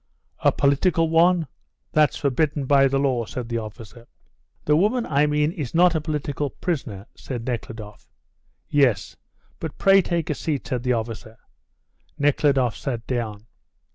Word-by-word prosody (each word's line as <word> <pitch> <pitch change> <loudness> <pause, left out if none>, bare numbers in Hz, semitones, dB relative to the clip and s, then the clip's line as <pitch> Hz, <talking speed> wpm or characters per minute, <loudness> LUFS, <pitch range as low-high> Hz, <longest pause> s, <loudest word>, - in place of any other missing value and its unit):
"A - - +4
political 160 +4 +2
one? 170 +1 +4 0.5
That's 155 -1 +3
forbidden 145 +1 0
by 135 0 +5
the 135 +1 0
law," 130 -4 0
said 120 +1 -6
the 115 -1 -1
officer. 115 +2 -10 0.6
"The 150 - +3
woman 215 +9 +2
I 145 +1 +2
mean 150 +1 +1
is 150 -5 -6
not 175 0 +5
a 160 - 0
political 150 -2 -3
prisoner," 125 - -4
said 120 -3 -6
Nekhludoff. 110 -4 -6 0.6
"Yes. 125 -10 +1 0.4
But 160 - -6
pray 195 0 +5
take 170 -2 -2
a - - +1
scat," 145 -1 -3
said 125 -2 -2
the 125 0 +1
officer. 115 -1 -5 0.8
Nekhludoff 140 -4 +2
sat 120 -5 -4
down. 110 -4 -4
140 Hz, 145 wpm, -23 LUFS, 120-155 Hz, 0.8 s, by